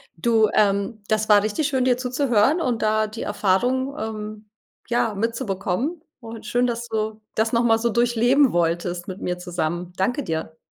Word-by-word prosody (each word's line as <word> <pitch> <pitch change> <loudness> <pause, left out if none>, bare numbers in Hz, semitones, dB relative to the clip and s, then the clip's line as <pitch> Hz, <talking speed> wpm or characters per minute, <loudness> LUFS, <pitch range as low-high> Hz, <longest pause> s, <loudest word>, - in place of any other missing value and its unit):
Du, 220 +4 +3
ähm, 205 +1 +1
das 215 0 0
war 205 -1 +6
richtig 220 +8 0
schön, 260 -3 0
dir 250 -1 +3
zuzuhören 255 +2 +2
und 250 -7 -1
da 215 0 +2
die 215 +2 -8
Erfahrung, 255 +8 0
ähm, 215 -1 -6 0.4
ja, 240 -2 +1
mitzubekommen. 230 - -2 0.2
Und 225 0 -9
schön, 245 +1 +1
dass 235 0 -3
du 220 -1 -3
das 220 +1 +1
noch 235 +1 +3
mal 225 -1 +4
so 235 - +1
durchleben 240 +4 +3
wolltest 175 +1 -1
mit 185 +1 -7
mir 180 0 -2
zusammen. 175 0 -3
Danke 245 +9 0
dir. 160 0 -4
220 Hz, 170 wpm, -23 LUFS, 195-245 Hz, 0.4 s, war